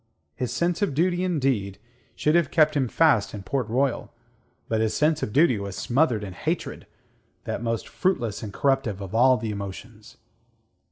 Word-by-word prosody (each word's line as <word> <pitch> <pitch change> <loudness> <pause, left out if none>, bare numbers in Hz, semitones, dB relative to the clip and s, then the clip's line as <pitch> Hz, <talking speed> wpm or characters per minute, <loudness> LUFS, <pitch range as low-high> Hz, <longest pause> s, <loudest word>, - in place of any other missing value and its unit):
His 125 +9 -3
sense 170 +1 0
of 195 -10 0
duty, 175 +3 +1
indeed, 130 - 0 0.4
should 150 - +1
have 170 -4 +3
kept 155 -2 +3
him 135 -3 +1
fast 130 -7 +2
in 100 - -7
Port 125 +3 -2
Royal; 130 +2 0 0.6
but 110 -1 0
his 110 -1 0
sense 155 +1 +2
of - - -2
duty 135 -4 +3
was 100 -1 -5
smothered 120 -4 +1
in 95 -3 -6
hatred - - -4 0.6
that - - -4
most 115 -1 -2
fruitless 120 - -1
and 105 - -6
corruptive 135 -4 0
of 95 -1 -7
all 125 +3 +5
the 115 -3 -4
emotions. 105 +2 -8
125 Hz, 170 wpm, -25 LUFS, 105-155 Hz, 0.6 s, all